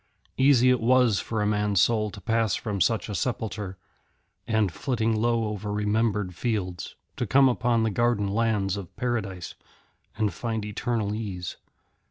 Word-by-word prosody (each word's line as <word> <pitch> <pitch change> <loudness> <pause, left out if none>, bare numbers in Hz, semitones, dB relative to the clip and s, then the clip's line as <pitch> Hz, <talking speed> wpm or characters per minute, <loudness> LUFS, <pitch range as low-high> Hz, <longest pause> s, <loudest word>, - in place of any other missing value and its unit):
Easy 130 -2 +5
it 125 - +2
was 120 -2 +4
for 110 -2 -2
a - - 0
man's 105 -2 +1
soul 105 +1 +2
to 95 - -10
pass 115 -3 +1
from 105 -4 -3
such 110 -2 +1
a 105 - -5
sepulchre, 105 -4 -3 0.7
and, 110 -4 +1
flitting 115 - -1
low 115 +1 +1
over 105 0 -4
remembered 105 -2 0
fields, 95 -5 -3 0.2
to - - -2
come 135 0 +5
upon 120 -2 +1
the 110 - +1
garden 115 -1 +1
lands 100 -2 0
of 95 -4 -9
Paradise 110 - -3 0.6
and 105 -4 0
find 110 +2 -3
eternal 105 0 -2
ease. 100 -5 -5
110 Hz, 155 wpm, -26 LUFS, 100-115 Hz, 0.7 s, Easy